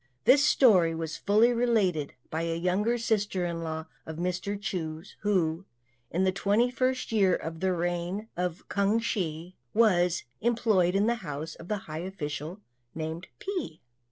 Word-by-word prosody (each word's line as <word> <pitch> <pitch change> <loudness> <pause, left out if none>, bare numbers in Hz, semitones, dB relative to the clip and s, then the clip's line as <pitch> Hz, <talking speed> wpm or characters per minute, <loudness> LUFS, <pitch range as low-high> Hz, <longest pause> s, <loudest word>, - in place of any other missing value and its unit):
This 280 - +6
story 195 - +5
was 160 -1 -4
fully 220 +4 +4
related 210 -11 +1 0.2
by 160 - -1
a 165 0 -1
younger 195 +7 +1
sister 210 -5 0
in 170 -1 -3
law 160 -1 -4 0.2
of 160 0 -7
Mr. 180 +3 -2
Chu's, 180 -3 -5
who, 185 -4 0 0.4
in 180 +3 0
the 190 - +3
twenty 205 +5 +2
first 255 0 0
year 195 -5 +4
of 160 0 -5
the 190 +1 +1
reign 175 +4 -2
K'ang 195 +4 0
Hsi, 180 -6 -3 0.2
was 180 -6 +3 0.2
employed 215 -6 +2
in 200 +1 +3
the 235 +1 +2
house 155 -1 -5
of 165 - -12
a 210 - 0
high 155 -5 -7
official 165 0 -5 0.3
named 160 +2 -4
Pi. 360 - -4
185 Hz, 155 wpm, -28 LUFS, 165-215 Hz, 0.4 s, This